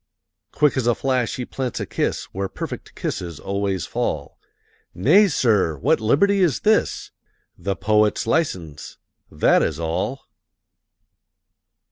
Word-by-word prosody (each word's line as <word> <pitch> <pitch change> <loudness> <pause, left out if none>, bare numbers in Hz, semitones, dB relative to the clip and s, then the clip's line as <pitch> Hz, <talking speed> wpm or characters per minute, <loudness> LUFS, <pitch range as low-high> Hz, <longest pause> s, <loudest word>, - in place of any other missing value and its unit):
Quick 150 -2 +2
as 125 -2 0
a 120 - +3
flash 130 -3 0
he 125 - -4
plants 130 -1 -4
a - - -3
kiss - - -2
Where 95 0 -3
perfect - - -7
kisses 85 -4 -4
always 100 -4 -2
fall. - - -3 0.6
"Nay, 200 - +5
sir! 105 - +1
what 70 - +2
liberty 180 - +3
is 165 -9 +2
this?" 215 0 +1 0.4
"The 100 -1 -3
Poet's 105 +1 +2
License, 90 - -2 0.3
that - - +3
is 80 -1 -1
all!" 80 0 -3
110 Hz, 125 wpm, -22 LUFS, 90-135 Hz, 0.6 s, Nay